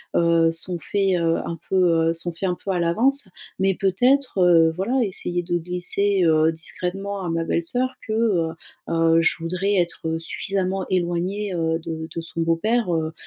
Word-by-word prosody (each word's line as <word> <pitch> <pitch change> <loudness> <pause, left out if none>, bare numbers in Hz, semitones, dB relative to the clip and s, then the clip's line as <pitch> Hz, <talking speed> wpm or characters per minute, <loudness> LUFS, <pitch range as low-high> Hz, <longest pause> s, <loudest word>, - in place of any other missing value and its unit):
heu, 165 -1 +3
sont 175 +2 0
faits, 195 -1 0
heu, 165 -1 +1
un 170 - -4
peu, 170 -3 +3
heu, - - +1
sont 170 +1 -1
faits 185 +3 -2
un 180 - -1
peu 195 - -3
à 180 - 0
l'avance, 220 +8 +1 0.3
mais 195 0 +2
peut-être, 245 +6 +2
heu, 170 -2 +5
voilà 235 +9 0
essayer 175 -3 -3
de 175 0 -1
glisser, 180 +3 0
heu, 160 0 +4
discrètement 190 +4 -5
à 175 - -3
ma 165 0 -1
belle-soeur 245 +12 -1
que, 215 - -3
heu 210 -7 +1 0.4
heu, 165 0 +3
je 165 - +2
voudrais 180 +5 -1
être 165 -2 -1
suffisamment 190 +2 -2
éloignée, 185 +3 -1
heu, 165 0 0
de 160 0 -6
de 165 - -4
son 165 0 -5
beau-père, 180 +4 +1
heu 160 0 -1
175 Hz, 175 wpm, -22 LUFS, 165-195 Hz, 0.4 s, heu